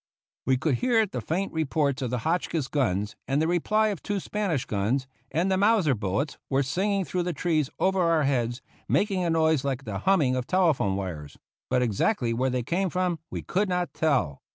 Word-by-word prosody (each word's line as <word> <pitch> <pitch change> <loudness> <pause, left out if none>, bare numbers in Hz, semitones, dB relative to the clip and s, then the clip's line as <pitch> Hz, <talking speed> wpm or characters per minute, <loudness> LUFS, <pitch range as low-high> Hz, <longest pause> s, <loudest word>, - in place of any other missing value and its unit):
We 130 -1 +4
could 145 +2 0
hear 230 -3 +3
the 130 - -5
faint 175 - -2
reports 150 -3 0
of 125 - -1
the 125 - -1
Hotchkiss 165 -3 0
guns 105 -9 -1
and 135 +2 +1
the 160 - +1
reply 215 +6 +2
of 200 -5 -4
two 205 -1 -2
Spanish 190 -9 -2
guns, 110 +7 0 0.2
and 170 +6 0
the 190 - +2
Mauser 200 -8 +4
bullets 110 +7 -2
were 135 +1 +2
singing 190 +8 0
through 180 +4 -1
the 175 0 -2
trees 155 -2 0
over 190 0 +2
our 165 -3 +3
heads, 120 -2 0 0.3
making 195 -3 +1
a 170 - 0
noise 160 -3 +2
like 135 -1 -2
the 100 -5 -4
humming 145 - +3
of 125 -1 -3
telephone 160 - +2
wires; 85 -7 -5 0.3
but 125 - +2
exactly 120 - +1
where 130 +3 0
they 125 -1 -1
came 185 +8 0
from 180 -2 -1
we - - -5
could 195 +2 0
not 180 -1 -1
tell. 135 - 0
155 Hz, 200 wpm, -26 LUFS, 125-180 Hz, 0.3 s, We